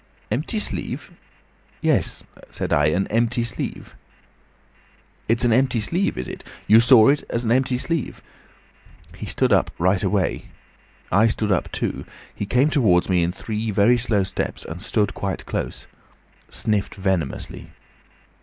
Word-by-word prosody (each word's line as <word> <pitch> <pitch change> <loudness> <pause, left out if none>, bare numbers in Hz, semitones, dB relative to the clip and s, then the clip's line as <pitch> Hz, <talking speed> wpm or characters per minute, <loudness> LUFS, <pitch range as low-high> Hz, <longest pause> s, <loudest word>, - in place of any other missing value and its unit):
'Empty 150 - -2
sleeve?' 210 - -2 0.7
'Yes,' - - +1 0.3
said - - -3
I, 75 0 +3
'an 90 +6 +1
empty 120 +2 +1
sleeve.' 115 -3 -4 1.4
"'It's 115 +2 +3
an 120 - +3
empty 130 -1 +2
sleeve, 170 - -1
is 65 - -4
it? - - -8 0.2
You 110 +2 +7
saw 115 -1 +7
it 145 +1 +2
was 115 +1 -1
an 115 - +1
empty 125 0 +2
sleeve?' 165 +2 -2 1.0
He - - -7
stood - - +1
up - - +3
right 95 +2 +2
away. 95 -1 0 0.7
I 105 +5 +5
stood 110 -1 0
up 95 - 0
too. - - -3 0.3
He 100 - -5
came 130 +7 +2
towards 100 - +3
me 90 -2 +3
in 85 +1 +1
three 110 +3 -4
very 105 +4 +3
slow 110 -4 +2
steps, 95 - -4
and 85 +2 -7
stood 105 -1 0
quite 95 -1 -4
close. - - -4 0.6
Sniffed 105 -2 -1
venomously. 95 -7 -3
110 Hz, 145 wpm, -22 LUFS, 95-120 Hz, 1.4 s, You